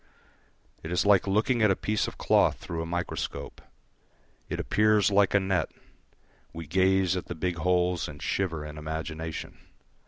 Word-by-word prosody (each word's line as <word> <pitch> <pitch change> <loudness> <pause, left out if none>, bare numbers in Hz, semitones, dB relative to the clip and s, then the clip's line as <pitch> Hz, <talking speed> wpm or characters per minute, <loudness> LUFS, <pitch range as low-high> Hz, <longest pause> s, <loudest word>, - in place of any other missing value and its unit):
It 80 - -7
is 90 - +1
like 100 -1 +4
looking 110 +5 +2
at 105 - +5
a 95 - +3
piece 105 +2 -1
of - - -8
cloth - - +3
through 85 -1 -5
a 80 - -4
microscope. 85 +1 -4 0.9
It - - -3
appears 105 -1 +3
like 100 0 +3
a - - +6
net; 95 -4 0 0.8
we 85 0 -7
gaze 95 +2 +2
at 90 - -4
the 90 - -5
big 90 +1 -2
holes 90 0 +1
and 75 -1 -9
shiver 80 -5 -2
in 75 0 -8
imagination. 80 +1 -5
90 Hz, 160 wpm, -27 LUFS, 80-100 Hz, 0.9 s, a